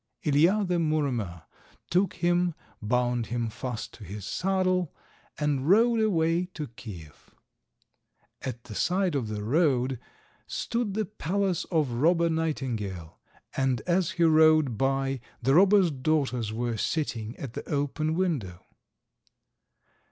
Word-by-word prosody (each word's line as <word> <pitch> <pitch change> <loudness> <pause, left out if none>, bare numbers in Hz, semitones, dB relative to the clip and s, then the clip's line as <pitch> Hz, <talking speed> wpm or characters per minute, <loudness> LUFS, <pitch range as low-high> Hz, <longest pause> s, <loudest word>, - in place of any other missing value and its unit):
Ilija, 170 +8 +3
the 180 -1 +1
Muromer, 130 - -1 0.5
took 185 +3 +2
him, 175 -1 +1 0.3
bound 120 +1 0
him 120 -1 -2
fast 120 0 -5
to 110 - -12
his 100 +1 -7
saddle, 185 - 0 0.4
and 145 -1 0
rode 230 +4 +5
away 170 -5 +2
to 150 -5 -5
Kiev. 105 -11 -11 1.1
At 120 -3 -5
the 120 - -10
side 180 - +1
of 135 -6 -1
the 105 -1 -4
road 130 -1 +1 0.5
stood 230 -4 -2
the 215 0 0
palace 195 -1 -1
of 155 -7 0
Robber 165 +7 +2
Nightingale, 115 - -3 0.4
and 130 -3 +1
as 180 -1 0
he 170 - +3
rode 155 -5 +5
by 135 +2 0 0.2
the 135 +3 +2
robber's 190 +1 +5
daughters 130 -5 0
were 115 0 -2
sitting 115 -5 -2
at 130 -5 -7
the - - -7
open 150 +2 -1
window. 130 - -2
145 Hz, 125 wpm, -27 LUFS, 120-175 Hz, 1.1 s, rode